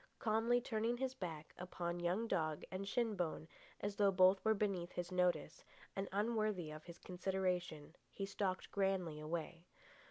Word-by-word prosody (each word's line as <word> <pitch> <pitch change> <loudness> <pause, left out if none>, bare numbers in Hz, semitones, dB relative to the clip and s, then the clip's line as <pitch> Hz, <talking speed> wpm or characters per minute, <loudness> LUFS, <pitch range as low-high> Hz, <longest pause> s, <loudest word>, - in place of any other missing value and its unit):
Calmly 230 +1 +3
turning 235 0 0
his 260 0 -1
back 165 -10 -6
upon 175 -1 -3
young 180 +7 +1
dog 155 -6 0
and 190 +1 -3
shin 225 0 +1
bone, 160 -3 -2 0.3
as 205 0 -2
though 200 -1 +5
both 185 +1 +6
were 220 0 +4
beneath 195 -4 0
his 175 +1 -3
notice 180 -4 +1 0.3
and 195 0 -2
unworthy 210 -5 0
of 155 0 -8
his 170 -1 -9
consideration, 180 -4 -2 0.2
he 195 - -3
stalked 195 -1 -2
grandly 190 -6 +1
away. 165 +2 -4
185 Hz, 155 wpm, -39 LUFS, 175-210 Hz, 0.3 s, both